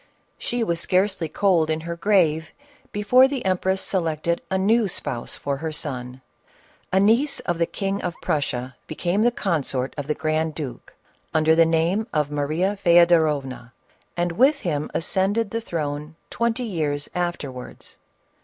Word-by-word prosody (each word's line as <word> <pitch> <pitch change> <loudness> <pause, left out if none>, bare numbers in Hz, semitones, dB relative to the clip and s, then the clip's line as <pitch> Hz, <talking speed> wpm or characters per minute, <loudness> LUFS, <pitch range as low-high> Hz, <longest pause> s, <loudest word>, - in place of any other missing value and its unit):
She 240 -1 -1
was 170 -6 -1
scarcely 185 -2 +1
cold 175 -4 +2
in 160 0 -1
her 170 +1 -5
grave, 170 -4 +2 0.4
before 250 +6 +5
the 270 -5 -4
em 185 -1 +2
press 190 0 0
selected 170 -2 -1
a 190 - +1
new 215 +3 +3
spouse 120 -9 -2
for 140 -1 -3
her 160 +2 -4
son. 130 -4 -6 0.7
A 190 - +3
niece 235 +9 +3
of 175 -2 -2
the 170 - +2
King 195 0 -2
of 175 -2 -3
Prussia 130 -4 -2
became 175 +5 -1
the 240 - +5
consort 150 - -1
of 145 - -5
the 150 - 0
grand 155 0 -1
duke, 145 -6 -7 0.4
under 155 0 +4
the 165 0 +5
name 170 +7 +1
of 150 -1 +1
Maria 155 +7 0
Feodorovna, 160 -8 +3 0.4
and 175 0 0
with 275 - +3
him 150 -4 -2
ascended 200 +5 +1
the 230 - -2
throne 150 -5 -4 0.2
twenty 235 +1 0
years 150 -9 -2
afterwards. 150 -8 -5
170 Hz, 155 wpm, -23 LUFS, 150-195 Hz, 0.7 s, before